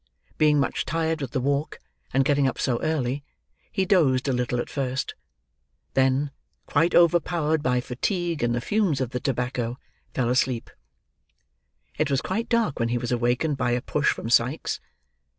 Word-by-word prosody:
Being 150 -1 +5
much - - 0
tired 160 -1 -1
with 135 - -3
the 130 - -1
walk, 140 +3 -1 0.3
and 135 0 +2
getting 140 -1 +3
up 130 - -2
so 120 -2 0
early, 140 -3 -1 0.5
he 190 - 0
dozed 145 -9 +3
a 135 - +2
little 125 0 -1
at - - -2
first; 130 -1 -2 0.8
then, 135 +2 +2 0.3
quite 165 +2 +2
overpowered 165 -2 +3
by 125 -3 +1
fatigue 170 - -2
and 120 0 +1
the 120 - -1
fumes 195 - +1
of 130 -2 -2
the 125 - -2
tobacco, 125 -3 -2 0.4
fell 125 -2 +1
asleep. 125 -1 0 1.3
It 155 - +2
was 135 -2 +2
quite 215 - -3
dark 230 - +1
when 115 0 +1
he 120 - +1
was 120 0 -3
awakened 125 +5 +1
by 125 -2 +1
a 120 - 0
push 150 -1 +1
from 115 - -5
Sikes. 125 +6 +2
135 Hz, 170 wpm, -25 LUFS, 125-155 Hz, 1.3 s, Being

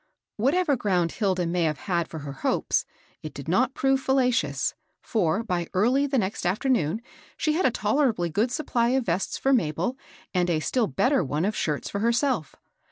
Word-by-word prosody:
Whatever 285 - +2
ground 180 -7 0
Hilda 190 -4 0
may 175 +1 0
have 155 -3 +1
had 170 -4 -1
for 160 - -8
her 140 0 -6
hopes, 135 - 0 0.4
it 155 -2 -8
did 140 - -8
not 245 +10 +2
prove 270 0 +2
fallacious; 250 - +1 0.3
for, 205 0 0
by 180 -6 -2
early 250 +9 +3
the 275 -1 0
next 200 -3 -1
afternoon, 210 - 0 0.3
she 305 - +1
had 340 0 +2
a - - +4
tolerably 215 - +1
good 215 +9 +1
supply 245 -4 0
of 260 - -1
vests 180 +2 -1
for 270 - +2
Mabel 185 - 0 0.3
and 180 -1 +1
a 165 -3 +2
still 230 +8 0
better 250 - +2
one 150 +4 -1
of 210 +1 -1
shirts 150 -2 -2
for 200 - -3
herself. 235 - 0
205 Hz, 180 wpm, -26 LUFS, 170-255 Hz, 0.4 s, a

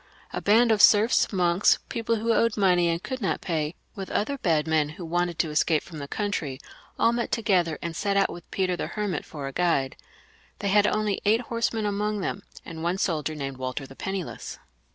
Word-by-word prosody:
A - - -3
band 225 +3 +4
of 215 -2 +3
serfs, 210 +3 +5
monks, 180 -1 +3
people 230 -2 -1
who 230 +1 +1
owed 230 -1 +2
money 180 -4 +3
and 170 +1 -2
could 260 -1 -5
not 195 - 0
pay, 160 -1 -2 0.2
with 195 -1 -7
other 275 +6 -1
bad 160 -7 +1
men 155 -2 +2
who 175 - -6
wanted 175 0 -1
to 160 - 0
escape 155 +1 +2
from 160 -3 -10
the 140 - -6
country, 160 -9 -3 0.4
all 230 - +4
met 235 0 -2
together 180 -8 +1
and 170 -1 -4
set 200 +2 0
out 195 - +3
with 175 -1 -12
Peter 185 -2 0
the - - -3
Hermit 205 -7 -3
for 145 -3 -7
a 135 - -4
guide. 165 -6 +1 0.6
They 200 - -2
had 205 +1 +4
only 210 -2 0
eight 220 +3 +3
horse 230 -1 -1
men 220 -2 -2
among 210 0 -1
them, 195 - -3 0.2
and 165 -2 -8
one 175 +3 0
soldier 155 -5 -1
named 135 -3 -5
Walter 130 +1 -4
the 135 - -13
Penni 190 +3 -3
less. - - -8
185 Hz, 215 wpm, -26 LUFS, 160-210 Hz, 0.6 s, serfs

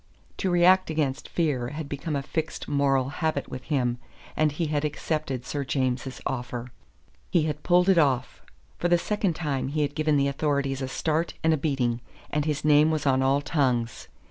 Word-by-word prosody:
To 190 - 0
react 180 +1 +5
against 150 -3 -1
fear 145 -8 0
had 150 +3 -5
become 145 +2 -3
a 140 - -1
fixed 160 +3 -4
moral 135 -2 +2
habit 155 -1 -2
with 130 - -7
him, 125 -5 0 0.4
and 155 -1 +2
he 165 +4 -2
had 150 -1 -1
accepted 150 -4 -2
Sir 145 -1 -3
James's 130 -1 -1
offer. 125 -1 -4 0.6
He 170 - +3
had 150 -1 -2
pulled 180 +2 +3
it 190 -3 +5
off. 130 -4 +1 0.4
For 175 - +1
the 175 0 +4
second 200 -1 -1
time 145 -6 -2
he 150 +2 0
had 145 0 -2
given 155 -1 +2
the 140 0 +2
authorities 140 -1 -1
a 130 - -2
start 160 +4 -1
and 160 0 +4
a - - +2
beating, 130 -5 0 0.3
and 150 0 0
his 150 -1 -1
name 150 +1 +6
was 155 -2 -1
on 130 -1 +3
all 135 +2 +3
tongues. 130 -6 0
145 Hz, 190 wpm, -26 LUFS, 135-155 Hz, 0.6 s, name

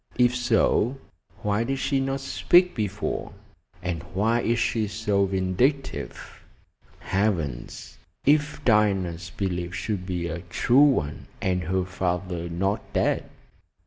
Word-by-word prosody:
If 125 0 +4
so, 120 +1 +2 0.5
why 105 +2 +1
did 135 +3 -1
she 135 +1 0
not 135 0 -1
speak 180 +6 +4
before, 105 -1 -3 0.5
and 90 -2 -2
why 115 +4 +2
is 115 0 +1
she 115 -2 +1
so 105 -1 +1
vindictive? 95 +9 -1 0.6
Heavens! 90 - -2 0.3
If 150 +1 +2
Diana's 95 -6 +2
belief 90 -1 -3
should 95 0 -3
be 90 -2 -2
a 85 0 -4
true 95 +9 +2 0.2
one, 75 - -9
and 90 -2 0
her 95 +2 0
father 90 -2 -2
not 95 +4 0
dead? - - +1
100 Hz, 120 wpm, -25 LUFS, 90-120 Hz, 0.6 s, If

